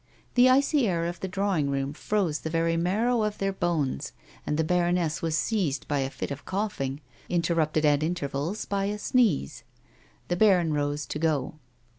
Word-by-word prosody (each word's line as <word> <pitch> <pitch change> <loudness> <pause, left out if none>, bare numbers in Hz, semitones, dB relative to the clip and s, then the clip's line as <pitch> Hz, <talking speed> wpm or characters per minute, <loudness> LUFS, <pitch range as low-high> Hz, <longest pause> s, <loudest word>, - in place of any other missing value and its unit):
The 250 +1 +6
icy 275 0 +3
air 170 -3 0
of 175 0 -4
the 190 - -3
drawing 190 -6 0
room 135 0 -1
froze 180 -3 -1
the 160 - -5
very 165 +1 +1
marrow 215 +8 +1
of 210 -1 -1
their 195 0 -1
bones, 165 - -1 0.3
and 150 - 0
the 160 - +2
baroness 175 -1 +1
was 160 -1 0
seized 170 - -1
by 145 -1 0
a 135 -1 -1
fit 140 - -5
of 140 0 -6
coughing, 155 -9 -3 0.3
interrupted 165 -3 +1
at 145 -1 +4
intervals 155 +2 -2
by 195 -1 -1
a 205 +1 -2
sneeze. 210 - +1 0.7
The 175 - -1
baron 180 -6 +4
rose 145 0 -1
to 150 - -5
go. 155 -2 -1
170 Hz, 175 wpm, -27 LUFS, 150-195 Hz, 0.7 s, The